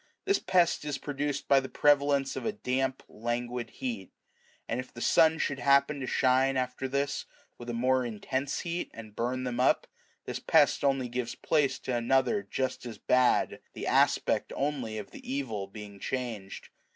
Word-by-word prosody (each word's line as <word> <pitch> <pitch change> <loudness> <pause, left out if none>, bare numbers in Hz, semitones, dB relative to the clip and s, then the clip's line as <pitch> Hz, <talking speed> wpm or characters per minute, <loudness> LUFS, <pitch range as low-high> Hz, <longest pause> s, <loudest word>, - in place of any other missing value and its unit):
This 395 0 +3
pest 175 -4 +2
is 150 -2 -2
produced 145 0 -3
by 140 - +6
the 135 0 -6
prevalence 140 -1 +3
of - - -4
a 220 - 0
damp, 135 -8 -2
languid 120 +2 -3
heat; 115 -8 -5 0.6
and 115 - -2
if 130 - -6
the - - -10
sun 160 +6 +4
should 145 -4 -1
happen 140 +3 +3
to 130 - -4
shine 130 +1 +3
after 130 +1 -2
this 140 +1 -1 0.3
with 120 0 -8
a - - -2
more 130 +2 +2
intense 130 +5 -2
heat 170 +1 -3
and 110 -2 -10
burn 125 +2 -1
them 125 -1 -3
up, 130 - +3 0.4
this - - -4
pest - - +3
only 135 -2 +2
gives 120 -1 -3
place 145 -4 +1
to - - -4
another2 130 - +1
just 130 -1 -2
as 120 -3 -7
bad, 125 -1 +2
the - - -6
aspect - - +2
only 135 -6 -2
of 105 -2 -7
the - - -9
evil 115 -8 -3
being 100 0 -10
changed. 110 -5 -5
130 Hz, 175 wpm, -29 LUFS, 120-140 Hz, 0.6 s, by